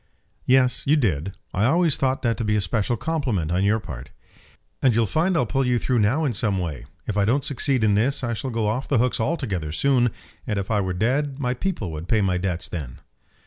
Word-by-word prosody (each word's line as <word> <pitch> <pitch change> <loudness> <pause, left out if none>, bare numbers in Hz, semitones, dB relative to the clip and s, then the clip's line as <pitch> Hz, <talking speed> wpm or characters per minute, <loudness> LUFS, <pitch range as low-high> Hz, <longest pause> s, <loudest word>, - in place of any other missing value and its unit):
"Yes, 130 0 +3
you 150 - +5
did. 95 - 0 0.2
I 100 +3 +1
always 165 +3 +3
thought 130 0 0
that 115 -2 +2
to 115 - -2
be 105 -1 +1
a 105 - +2
special 105 +4 0
compliment 125 - -1
on 90 +2 +1
your 105 +3 +2
part." 65 - -8 0.7
"And 125 -4 +3
you'll 115 0 +3
find 170 - +1
I'll 125 - +2
pull 135 +5 0
you 125 -1 +2
through 125 0 0
now 125 +10 +2
in 130 - 0
some 105 -3 0
way. 85 -7 -4 0.2
If 105 - -3
I - - +3
don't 135 +6 +1
succeed 135 -3 +1
in 105 -1 +4
this 135 +7 +1
I 120 -1 -1
shall 130 +4 -4
go 115 -3 -1
off 115 +6 -1
the 140 - +2
hooks 125 +2 +1
altogether 110 - -2
soon; 125 - +2 0.4
and 105 -4 -1
if 100 +2 -3
I 105 -2 +2
were 95 -1 -2
dead 135 +8 0
my 125 -3 -1
people 125 - -3
would 80 +2 -6
pay 110 +1 +2
my 90 -2 +1
debts 90 -2 -2
then." 70 -8 -6
115 Hz, 230 wpm, -23 LUFS, 95-135 Hz, 0.7 s, you